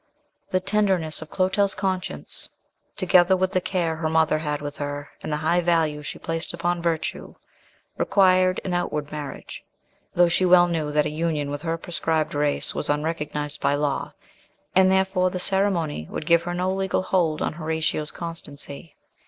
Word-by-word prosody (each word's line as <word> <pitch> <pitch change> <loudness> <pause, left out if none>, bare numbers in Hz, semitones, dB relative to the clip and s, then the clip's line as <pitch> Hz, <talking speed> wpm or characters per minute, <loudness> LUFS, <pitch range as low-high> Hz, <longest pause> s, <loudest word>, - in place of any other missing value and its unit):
The 185 - +2
tenderness 185 -6 0
of 160 - -9
Clotel's 195 +1 +1
conscience, 190 -1 -3 0.5
together 185 0 +5
with 185 0 +1
the 185 - +1
care 175 -4 -1
her 160 -1 -1
mother 160 -1 +3
had 150 -2 -2
with 145 0 -6
her 145 0 -5
and - - -5
the 150 - 0
high 160 +3 +2
value 165 -3 +1
she 150 - -6
placed 165 +1 -1
upon 175 0 -1
virtue, 165 -2 -2 0.6
required 185 -2 +4
an 185 - -2
outward 150 -4 -2
marriage; 145 -3 -7 0.5
though 175 0 +6
she 170 +2 +2
well 180 -1 +6
knew 160 -3 -1
that 150 0 +2
a - - -1
union 155 -2 -1
with 145 0 -4
her 165 0 -1
proscribed 160 -2 -1
race 145 0 0
was - - -2
unrecognised 150 -1 -2
by 140 - +2
law, 145 -1 -1 0.6
and 190 0 +6
therefore 190 -1 +2
the 180 - -4
ceremony 180 - 0
would - - -5
give 170 0 +5
her 175 +1 -4
no 185 +1 0
legal 190 -1 0
hold 170 -5 +1
on - - -1
Horatio's 155 -1 -1
constancy. 165 -2 -8
165 Hz, 170 wpm, -24 LUFS, 150-185 Hz, 0.6 s, though